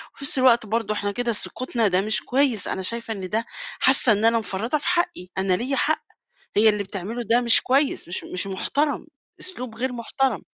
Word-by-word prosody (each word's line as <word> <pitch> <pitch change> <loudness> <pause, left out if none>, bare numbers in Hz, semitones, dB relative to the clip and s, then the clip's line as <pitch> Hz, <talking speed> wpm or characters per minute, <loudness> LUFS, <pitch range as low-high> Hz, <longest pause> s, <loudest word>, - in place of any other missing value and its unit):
وفي 275 - -11
نفس 275 - +4
الوقت 240 -3 +4
برضو 220 0 -1
إحنا 205 -1 -2
كده 240 +3 -1
سُكُوتنا 235 0 0
ده 185 0 +2
مش 215 +1 0
كويِّس، 260 -5 +1
أنا 190 - -2
شايفة 230 +3 -3
إن 190 -3 -7
ده 225 +2 -1 0.3
حاسة 265 -2 +5
إن 210 +1 +2
أنا 230 0 +4
مفرّطة 220 +7 -2
في 295 - -5
حَقِّي 350 - 0
أنا 190 -1 +1
ليَّ 250 +8 -1
حَقّ، 310 +3 +1 0.6
هي 220 +1 +6
اللي 210 -1 +1
بتعملُه 200 +5 -5
ده 235 +3 +3
مش 235 -2 +5
كويِّس، 270 - +1
مش 175 - -4
مش 185 +2 -4
مُحترم، 285 +11 -1 0.3
أسلوب 250 -11 -7
غير 255 +1 -2
مُحترم. 255 +3 -2
230 Hz, 200 wpm, -23 LUFS, 205-260 Hz, 0.6 s, هي